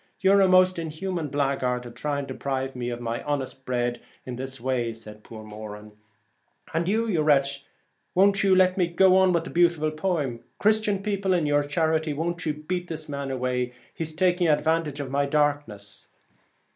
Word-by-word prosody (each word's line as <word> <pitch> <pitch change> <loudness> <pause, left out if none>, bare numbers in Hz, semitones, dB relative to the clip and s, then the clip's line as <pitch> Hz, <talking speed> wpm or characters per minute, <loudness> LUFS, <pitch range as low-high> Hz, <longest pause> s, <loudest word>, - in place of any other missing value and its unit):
You're 195 +1 +5
a 190 - +5
most 185 -1 +4
inhuman 165 +1 -3
blaguard 135 -3 -1
to 120 - -9
try 145 +3 -2
to - - -6
deprive 135 -1 -3
me 120 -1 -3
of 120 -1 -4
my 115 -1 -3
honest 135 -2 -4
bread 120 -1 -1 0.2
this 130 +1 -5
way,' 125 -1 -1
replied 110 -2 -8
poor 110 -1 -10
Moran. 105 0 -9 0.4
' - - -26
And 165 +1 0
you, 220 +4 +1
you 175 -8 +1
wretch, 140 -2 +2 0.5
won't 195 +2 +4
let 185 -1 +4
me 175 - +3
go 185 +2 +4
on 190 -1 +5
with 170 -2 +1
the - - -8
beautiful 170 -3 +2
poem. 155 -8 -2
Christian 210 -2 +2
people, 200 -2 0
in 170 -4 +1
your 145 0 +3
charity 160 +1 0
won't 170 +2 -3
you 150 - 0
beat 175 +4 -4
this 160 -2 -6
man 140 -1 -4
away? 125 -1 -2 0.2
he's 160 -1 -4
taking 180 0 +2
advantage 155 -1 +1
of 135 -2 -5
my 140 +1 +1
darkness.' 145 -9 -1
150 Hz, 180 wpm, -25 LUFS, 130-175 Hz, 0.5 s, You're